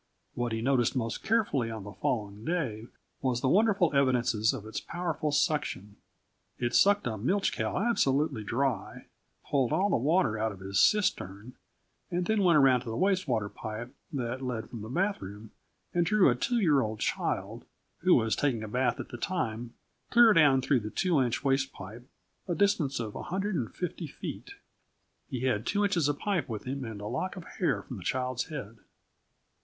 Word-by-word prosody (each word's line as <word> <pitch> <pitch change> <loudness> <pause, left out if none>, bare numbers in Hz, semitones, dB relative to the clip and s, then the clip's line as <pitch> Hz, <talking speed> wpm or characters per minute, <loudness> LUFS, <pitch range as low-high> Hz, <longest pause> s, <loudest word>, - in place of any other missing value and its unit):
What 120 -1 -2
he 110 0 -2
noticed 130 -2 +2
most 115 -3 -2
carefully 200 - +1
on 110 -3 -6
the 100 - -8
following 105 -2 -2
day 120 -9 -2 0.3
was 125 -3 0
the - - +1
wonderful 190 -2 +3
evidences 125 -5 +3
of 125 -6 -6
its 110 - -4
powerful 170 -3 -3
suction. 145 - 0 0.6
It 120 -1 -1
sucked 205 +1 +4
a 110 -4 -2
milch 190 - +1
cow 110 0 -2
absolutely 145 - +1
dry, 130 +4 -2 0.4
pulled 135 -4 +1
all 190 +6 +2
the - - +3
water 135 - +2
out 110 0 0
of 100 - -10
his 95 0 -1
cistern, 120 - +1 0.6
and 175 0 -1
then 220 +1 +1
went 175 -4 +5
around 130 -3 +5
to 120 - -7
the 115 - -3
waste 190 0 +1
water 110 -5 0
pipe 110 +5 -7 0.2
that 125 -2 -3
led 125 -4 -4
from 115 - -6
the 110 - -7
bath 195 +9 0
room 105 +3 -9 0.4
and 175 - +3
drew 195 -5 +4
a - - 0
2 240 - 0
year 155 -11 +4
old 110 -2 -3
child, - - -2 0.4
who - - +5
was 110 0 +2
taking 125 -6 0
a - - -5
bath 125 +4 0
at - - -6
the 120 - -7
time, 120 -8 -3 0.3
clear 235 -2 +7
down 145 -5 +5
through 135 -1 +3
the 105 -1 -5
two 170 - +1
inch 120 -2 -1
waste 135 0 +1
pipe, 110 +6 -10 0.4
a 175 - -1
distance 170 -10 +1
of 110 -3 -4
150 180 - -3
feet. - - -8 0.7
He 125 - -4
had 130 -5 +1
two 205 0 +1
inches 180 -7 +2
of 145 - +1
the - - -20
pipe 190 -11 0
with 110 -3 -4
him 135 +1 -4
and 110 -3 -7
a - - -6
lock 130 - -3
of 185 - -8 0.2
hair - - +1
from - - -8
the - - -9
child's 130 -1 -1
head. 115 -7 -7
130 Hz, 190 wpm, -29 LUFS, 115-170 Hz, 0.7 s, clear